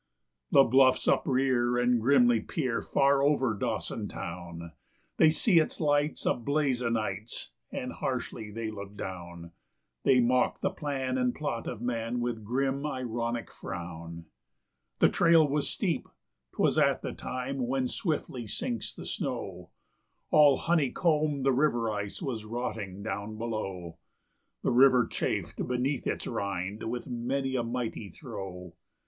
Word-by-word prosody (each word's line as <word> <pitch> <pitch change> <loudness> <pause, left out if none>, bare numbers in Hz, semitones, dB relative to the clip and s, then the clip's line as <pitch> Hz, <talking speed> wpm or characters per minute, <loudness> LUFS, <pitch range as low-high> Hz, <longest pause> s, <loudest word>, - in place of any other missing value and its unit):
The 135 - +7
bluffs 130 +1 +4
uprear 125 -2 +2
and 125 -1 +3
grimly 120 -2 +5
peer 125 +1 -2
far 140 0 +3
over 140 -4 +3
Dawson - - -2
town; 85 -1 -7 0.5
They 160 - +7
see 170 +3 +4
its 155 - -1
lights 145 -1 +1
a - - +4
blaze 135 0 0
o' 120 - 0
nights 110 -1 -3 0.2
and - - -4
harshly 110 - -3
they 110 +1 -4
look 100 -1 -8
down; 85 -2 -7 0.5
They 130 - +5
mock 125 +1 +2
the 190 - +1
plan 135 -7 -2
and 125 -1 +1
plot 140 -6 -3
of 120 -1 -5
man 120 0 -1
with 120 -2 -2
grim, 135 +5 0
ironic 120 -4 -3
frown. 85 -2 -7 0.7
The - - +6
trail 165 -3 +5
was 145 +1 0
steep; 180 -6 -1 0.4
'twas - - +2
at - - +3
the - - -3
time 130 0 -3
when 130 0 0
swiftly 145 - -3
sinks 240 - -3
the - - -8
snow; - - -4 0.6
All 145 -3 +7
honey 160 -5 +2
combed, 150 -4 +1
the 135 - +4
river 120 -5 +2
ice 100 - -4
was 120 -7 -3
rotting 105 -4 -4
down 110 0 -4
below; 95 -7 -4 0.6
The - - +2
river 125 -1 +6
chafed - - -2
beneath 125 +3 -1
its - - -2
rind 100 +2 -3
with 120 +1 -4
many 130 +2 -2
a 125 - +2
mighty 115 -3 -3
throe. 90 0 -8
125 Hz, 140 wpm, -29 LUFS, 110-135 Hz, 0.7 s, The